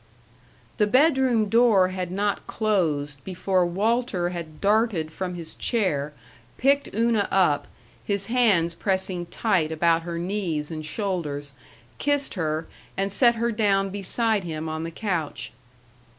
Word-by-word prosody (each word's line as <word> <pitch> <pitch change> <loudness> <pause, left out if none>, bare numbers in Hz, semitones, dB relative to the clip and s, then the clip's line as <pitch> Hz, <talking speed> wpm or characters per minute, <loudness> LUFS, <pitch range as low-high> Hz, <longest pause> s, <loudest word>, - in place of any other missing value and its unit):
The 210 - +3
bedroom 260 -3 +3
door 220 -4 +4
had 185 -1 -4
not 200 +2 -1
closed 155 - -1
before 185 -1 0
Walter 200 -1 0
had 165 -4 -7
darted 205 -6 +1
from 180 +2 -4
his 165 -2 -7
chair, 155 - -1 0.5
picked 280 +2 +2
Una 225 -2 +2
up, 175 -7 +2 0.4
his 200 -1 -1
hands 205 -8 +3
pressing 185 -1 -2
tight 175 -5 0
about 165 +1 +2
her 170 0 -5
knees 170 -4 -2
and 155 -1 -5
shoulders, 155 -6 -3 0.5
kissed 285 -1 0
her, 160 -3 -2 0.3
and 195 +1 0
set 235 +3 +4
her 235 +1 0
down 200 -3 +1
beside 205 +2 0
him 160 -2 -4
on 160 0 -3
the - - -4
couch. 165 - -3
190 Hz, 135 wpm, -25 LUFS, 165-220 Hz, 0.5 s, door